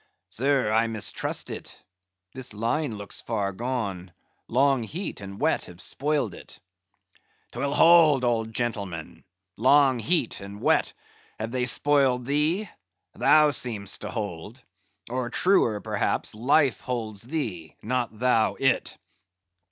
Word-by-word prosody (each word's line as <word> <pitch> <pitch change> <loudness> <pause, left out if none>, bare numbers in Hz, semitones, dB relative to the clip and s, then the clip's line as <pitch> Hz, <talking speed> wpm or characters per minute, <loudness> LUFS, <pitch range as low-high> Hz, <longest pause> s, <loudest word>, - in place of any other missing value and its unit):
"Sir, 135 -3 +1
I 110 +1 +3
mistrust 110 -2 -2
it; - - -8 0.5
this 125 -4 -4
line 115 +2 -1
looks 100 0 -7
far 105 -4 -2
gone, 100 -5 -4 0.4
long 135 +1 +2
heat 160 - -5
and 100 0 -8
wet - - +1
have 90 0 -13
spoiled 145 -1 -1
it." - - -12 0.9
"'Twill 140 +1 -2
hold, 160 -6 +6
old 115 -2 0
gentleman. 100 -8 -4 0.3
Long 130 +1 +4
heat 150 +1 0
and 100 +1 -9
wet, - - +2 0.4
have 110 +1 -4
they 125 0 0
spoiled 135 -2 +2
thee? 155 - +1 0.5
Thou 150 -1 +5
seem'st 105 -8 -1
to 105 - -5
hold. 105 +2 -6 0.4
Or, 125 0 -3
truer 120 - +2
perhaps, - - -1
life 130 +3 +2
holds 110 -5 -4
thee; 110 - -4
not 120 -1 -2
thou 115 -2 +2
it." 135 -2 0
120 Hz, 125 wpm, -26 LUFS, 105-140 Hz, 0.9 s, hold